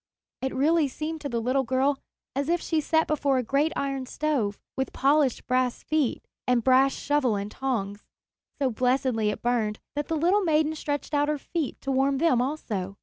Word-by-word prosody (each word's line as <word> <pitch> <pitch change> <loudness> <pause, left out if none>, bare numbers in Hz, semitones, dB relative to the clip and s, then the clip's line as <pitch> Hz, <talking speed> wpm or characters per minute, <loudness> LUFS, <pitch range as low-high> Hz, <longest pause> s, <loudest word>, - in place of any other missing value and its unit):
It 265 0 -2
really 305 +3 +3
seemed 310 +4 -5
to 285 - -4
the 235 -2 -1
little 255 +4 +1
girl 265 +3 +1 0.4
as 280 +2 -1
if 345 +1 +2
she 320 -1 0
sat 320 +1 +2
before 285 -3 +1
a 255 - +1
great 280 +6 +1
iron 275 -2 -2
stove, 255 -11 -1 0.2
with 265 0 -2
polished 280 -1 +2
brass 255 -1 0
feet 310 -5 0 0.2
and 250 -2 +2
brass 265 +2 +5
shovel 290 -7 +1
and 200 +1 -4
tongs. 210 -7 -3 0.6
So 270 -3 +1
blessedly 250 -2 +1
it 210 - -5
burned 225 -3 0 0.2
that 290 0 -2
the 325 - -1
little 360 +7 +3
maiden 310 -2 +2
stretched 290 -1 -4
out 290 0 +2
her 300 - 0
feet 310 0 -4
to 275 - -2
warm 270 +1 +2
them 280 -5 +3
also. 210 -9 -3
270 Hz, 190 wpm, -26 LUFS, 250-300 Hz, 0.6 s, brass